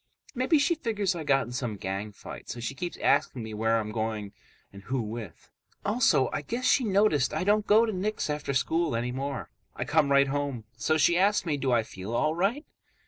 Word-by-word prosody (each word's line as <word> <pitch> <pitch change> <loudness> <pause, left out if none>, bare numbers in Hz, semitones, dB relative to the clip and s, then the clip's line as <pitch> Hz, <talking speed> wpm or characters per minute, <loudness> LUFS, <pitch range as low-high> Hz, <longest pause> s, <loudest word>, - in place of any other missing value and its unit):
Maybe 260 +5 +2
she 285 +4 +3
figures 215 - -1
I 170 -2 -5
got 135 -2 +2
in 120 - -9
some 125 -3 -3
gang 95 +2 -4
fight, 105 - -10
so 120 - -5
she 120 +3 -3
keeps 175 +6 -5
asking 120 - +1
me 110 -1 -7
where 110 +1 +1
I'm 110 -1 -4
going 110 -2 -3 0.4
and 100 - -11
who 130 +6 -2
with. 110 -5 -7 0.3
Also, 210 - +3
I - - -1
guess 235 - -4
she 255 - +4
noticed 195 - +2
I - - 0
don't 210 +2 +2
go 220 +2 +6
to 220 - -2
Nick's 210 +3 -2
after 150 -2 -2
school 165 +1 +1
anymore. 125 +3 -3 0.2
I - - -3
come 140 - +2
right 140 0 +5
home. 140 -4 -2
So 155 - +1
she 170 +3 +4
asks 200 +1 +3
me 155 -3 0
do 135 -2 -1
I 120 -2 +3
feel 100 +2 -6
all 155 +5 +2
right. 200 - 0
140 Hz, 210 wpm, -28 LUFS, -, 0.4 s, go